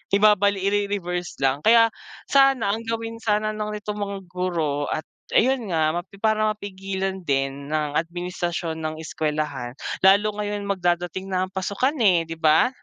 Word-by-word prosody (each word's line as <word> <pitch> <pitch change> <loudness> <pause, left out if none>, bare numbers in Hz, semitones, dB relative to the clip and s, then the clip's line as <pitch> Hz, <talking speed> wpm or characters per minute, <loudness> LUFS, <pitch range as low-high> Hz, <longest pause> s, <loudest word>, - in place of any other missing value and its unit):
ibabalik, 200 -1 +4
ire-reverse 195 -3 -1
lang. 135 +1 +2
Kaya 230 +5 +5 0.4
sana 270 -6 +4
ang 225 +2 -3
gawin 230 0 -3
sana 215 -1 +1
ng 210 0 -4
nitong 210 0 -5
mga 200 -1 -3
guro 165 -6 -1
at 155 - -2 0.3
ayun 255 -1 +3
nga 160 -4 +2
mapi 175 +4 -5
para 215 -1 +2
mapigilan 195 -1 -4
din 135 0 -1
ng 150 -1 -1
administrasyon 175 -1 -3
ng 155 -1 -3
eskuwelahan 150 -6 -3 0.3
lalo 200 +2 +6
ngayon 205 0 -2
magdadating 180 -1 -1
na 185 -1 -1
ang - - -34
pasukan 200 +10 -1
eh, 185 -8 +4
di 165 - -5
ba? 160 +7 +4
190 Hz, 150 wpm, -24 LUFS, 160-210 Hz, 0.4 s, lalo